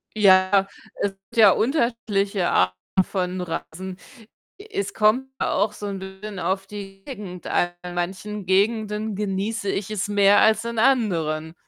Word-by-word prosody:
Ja, 195 Hz, -1 st, +5 dB, 0.3 s
es 200 Hz, -, +1 dB
gibt 195 Hz, +5 st, -19 dB
ja 215 Hz, -3 st, +8 dB
unterschiedliche 220 Hz, -, 0 dB
Arten 90 Hz, 0 st, +2 dB, 0.3 s
von 185 Hz, -1 st, -3 dB
Reisen. 180 Hz, +2 st, -6 dB, 0.6 s
Es 405 Hz, -1 st, -4 dB
kommt 225 Hz, +5 st, +2 dB
auch 205 Hz, +2 st, +1 dB
so 205 Hz, 0 st, -6 dB
'n 200 Hz, -1 st, -4 dB
bisschen 190 Hz, +1 st, -8 dB
auf 195 Hz, +1 st, -1 dB
die 195 Hz, -1 st, -9 dB
Gegend 200 Hz, -9 st, -8 dB
an. 175 Hz, -, +1 dB
In 180 Hz, 0 st, -7 dB
manchen 190 Hz, +3 st, -4 dB
Gegenden 210 Hz, +2 st, +1 dB
genieße 200 Hz, +1 st, -2 dB
ich 195 Hz, +1 st, -2 dB
es 205 Hz, -2 st, -2 dB
mehr 205 Hz, 0 st, +5 dB
als 220 Hz, 0 st, +4 dB
in 235 Hz, 0 st, -4 dB
anderen 170 Hz, -, +1 dB
200 Hz, 145 wpm, -23 LUFS, 190-215 Hz, 0.6 s, ja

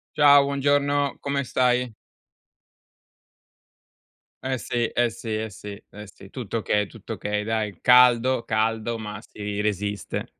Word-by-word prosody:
Ciao, 145 Hz, -2 st, +7 dB
buongiorno! 145 Hz, 0 st, +1 dB
Come 140 Hz, 0 st, -2 dB
stai? 125 Hz, -1 st, +1 dB, 2.5 s
Eh 130 Hz, 0 st, -1 dB
sì, 120 Hz, 0 st, -1 dB
eh 120 Hz, 0 st, +1 dB
sì, 110 Hz, -1 st, -5 dB
eh 110 Hz, +1 st, -3 dB
sì, 100 Hz, 0 st, -10 dB
eh 105 Hz, 0 st, -11 dB
sì, 95 Hz, 0 st, -15 dB
tutto 115 Hz, -2 st, -5 dB
okay, 105 Hz, -1 st, 0 dB
tutto -, -, -12 dB
okay, 105 Hz, 0 st, -3 dB
dai, 110 Hz, -3 st, -2 dB
caldo, 125 Hz, 0 st, +5 dB
caldo, 115 Hz, +1 st, -1 dB
ma 105 Hz, -1 st, -7 dB
si 105 Hz, -2 st, -6 dB
resiste. 105 Hz, -1 st, -2 dB
115 Hz, 125 wpm, -24 LUFS, 105-130 Hz, 2.5 s, Ciao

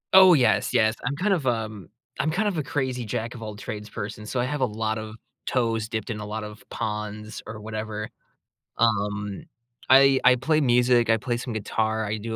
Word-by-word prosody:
Oh, 190 Hz, -1 st, +9 dB
yes, 130 Hz, -5 st, +2 dB
yes. 110 Hz, 0 st, +4 dB
I'm 135 Hz, +3 st, -1 dB
kind 195 Hz, +6 st, +1 dB
of, 155 Hz, -8 st, -1 dB
um 110 Hz, -6 st, -2 dB, 0.3 s
I'm 155 Hz, -, +1 dB
kind 195 Hz, +7 st, 0 dB
of 185 Hz, -6 st, -1 dB
a -, -, -1 dB
crazy 130 Hz, -2 st, -2 dB
jack 115 Hz, +2 st, -3 dB
of 120 Hz, -, -10 dB
all 110 Hz, -1 st, -6 dB
trades 105 Hz, 0 st, -7 dB
person. 105 Hz, +1 st, -6 dB
So, 125 Hz, -, -2 dB
I 120 Hz, -, +1 dB
have 145 Hz, +1 st, -3 dB
a -, -, +5 dB
lot 110 Hz, -1 st, -2 dB
of 110 Hz, 0 st, -7 dB, 0.3 s
toes 115 Hz, -4 st, 0 dB
dipped 110 Hz, +1 st, -3 dB
in 105 Hz, -, -4 dB
a 105 Hz, -, -5 dB
lot 110 Hz, +1 st, -4 dB
of 105 Hz, -1 st, -9 dB
ponds 105 Hz, 0 st, -4 dB
or 110 Hz, 0 st, -7 dB
whatever. 110 Hz, 0 st, -5 dB, 0.7 s
Um. 100 Hz, -3 st, 0 dB, 0.5 s
I 135 Hz, 0 st, +7 dB
I 125 Hz, 0 st, +7 dB
play 155 Hz, +5 st, +1 dB
music. 120 Hz, -2 st, +3 dB
I 115 Hz, -, +5 dB
play 120 Hz, +2 st, -2 dB
some 125 Hz, 0 st, -5 dB
guitar. 110 Hz, 0 st, -1 dB
I 105 Hz, +1 st, -2 dB
do 110 Hz, +1 st, -5 dB
110 Hz, 210 wpm, -25 LUFS, 105-125 Hz, 0.7 s, Oh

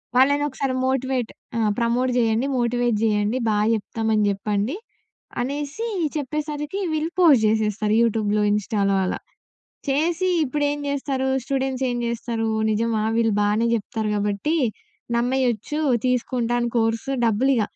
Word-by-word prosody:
వాళ్ళనొక్కసారి 275 Hz, 0 st, +2 dB
motivate 260 Hz, -2 st, -1 dB, 0.3 s
ఆ! -, -, 0 dB, 0.2 s
Promote 240 Hz, +2 st, +1 dB
జేయండి, 230 Hz, +2 st, +2 dB
motivate 240 Hz, -1 st, +1 dB
జేయండి 210 Hz, +2 st, +1 dB
బాగా 210 Hz, 0 st, +2 dB
చెప్తామని 220 Hz, 0 st, -1 dB
చెప్పండి, 205 Hz, -, -1 dB, 0.7 s
అనేసి 290 Hz, -, -3 dB, 0.3 s
చెప్పేసరికి 300 Hz, +4 st, -3 dB
వీళ్ళు 315 Hz, +2 st, -1 dB
పోస్ట్ 295 Hz, -10 st, +6 dB
జేసేస్తారు. 215 Hz, -1 st, +1 dB
యూట్యూబ్‌లో, 215 Hz, -2 st, +1 dB
ఇన్‌‌స్టా‌లో 205 Hz, -1 st, +1 dB
అలా -, -, -2 dB, 0.7 s
చేసి 325 Hz, +6 st, +1 dB, 0.2 s
ఇప్పుడేం 290 Hz, +1 st, -1 dB
జేస్తారు. 270 Hz, -1 st, -1 dB, 0.2 s
స్టూడెంట్స్ 265 Hz, -1 st, -1 dB
ఏం 245 Hz, -, -2 dB
జేస్తారు, 230 Hz, -1 st, -2 dB, 0.2 s
నిజమా! 220 Hz, 0 st, 0 dB
వీళ్ళు 225 Hz, -1 st, +2 dB
బానే 210 Hz, +3 st, +2 dB
జెప్తారు 215 Hz, 0 st, -2 dB
కాబట్టి 205 Hz, +9 st, -1 dB, 0.6 s
నమ్మేయచ్చు 250 Hz, +2 st, 0 dB, 0.3 s
తీసుకుంటాను 240 Hz, -1 st, 0 dB
కోర్సు 225 Hz, +4 st, 0 dB
డబ్బులిగ, 240 Hz, +3 st, +2 dB
240 Hz, 110 wpm, -23 LUFS, 220-275 Hz, 0.7 s, పోస్ట్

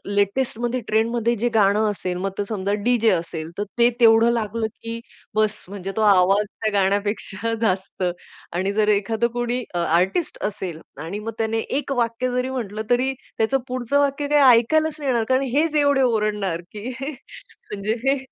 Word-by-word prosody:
लेटेस्टमध्ये, 240 Hz, +4 st, 0 dB
ट्रेंडमध्ये 230 Hz, +2 st, +1 dB
जे 240 Hz, +3 st, 0 dB
गाणं 210 Hz, +1 st, +4 dB
असेल, 185 Hz, -3 st, -4 dB
मग 195 Hz, +2 st, -2 dB
ते 205 Hz, -, -1 dB
समजा 200 Hz, -2 st, -1 dB
डीजे 235 Hz, -1 st, +3 dB
असेल, 165 Hz, -2 st, -3 dB
तर 205 Hz, -, 0 dB, 0.2 s
ते 235 Hz, 0 st, +6 dB
तेवढं 225 Hz, 0 st, +6 dB
लागलं 225 Hz, -1 st, -1 dB
की 230 Hz, +1 st, -7 dB, 0.4 s
बस 215 Hz, 0 st, +1 dB
म्हणजे 195 Hz, -1 st, -5 dB
तो -, -, +1 dB
आवाज 200 Hz, 0 st, +4 dB
त्या 215 Hz, +1 st, -4 dB
गाण्यापेक्षा 205 Hz, +2 st, 0 dB
जास्त 190 Hz, -3 st, -1 dB, 0.5 s
आणि 190 Hz, +3 st, -1 dB
जर 210 Hz, 0 st, +2 dB
एखादा 215 Hz, +3 st, +1 dB
कोणी 240 Hz, +1 st, -1 dB, 0.2 s
आर्टिस्ट 180 Hz, -, +1 dB
असेल 190 Hz, -5 st, -4 dB, 0.2 s
आणि 185 Hz, +6 st, -5 dB
मग 225 Hz, +2 st, -5 dB
त्याने 225 Hz, 0 st, 0 dB, 0.2 s
एक 290 Hz, -, -6 dB
वाक्य 235 Hz, +2 st, -1 dB
जरी 250 Hz, +1 st, -1 dB
म्हंटलं, 220 Hz, -5 st, -4 dB
तरी 255 Hz, +2 st, +2 dB, 0.2 s
त्याचं 225 Hz, +5 st, +2 dB
पुढचं 255 Hz, +2 st, 0 dB
वाक्य 285 Hz, 0 st, 0 dB
काही 280 Hz, -5 st, +6 dB
ऐकायलाच 315 Hz, +6 st, +1 dB
नाही 285 Hz, -2 st, -2 dB
येणार, 235 Hz, -2 st, +1 dB
कारण 260 Hz, +1 st, +3 dB
हेच 310 Hz, +1 st, +2 dB
एवढे 285 Hz, -2 st, +3 dB
ओरडणार 210 Hz, -7 st, 0 dB
की 210 Hz, +2 st, -7 dB, 0.2 s
म्हणजे 240 Hz, -, -7 dB
हे 275 Hz, +1 st, +3 dB
220 Hz, 165 wpm, -22 LUFS, 200-245 Hz, 0.5 s, ते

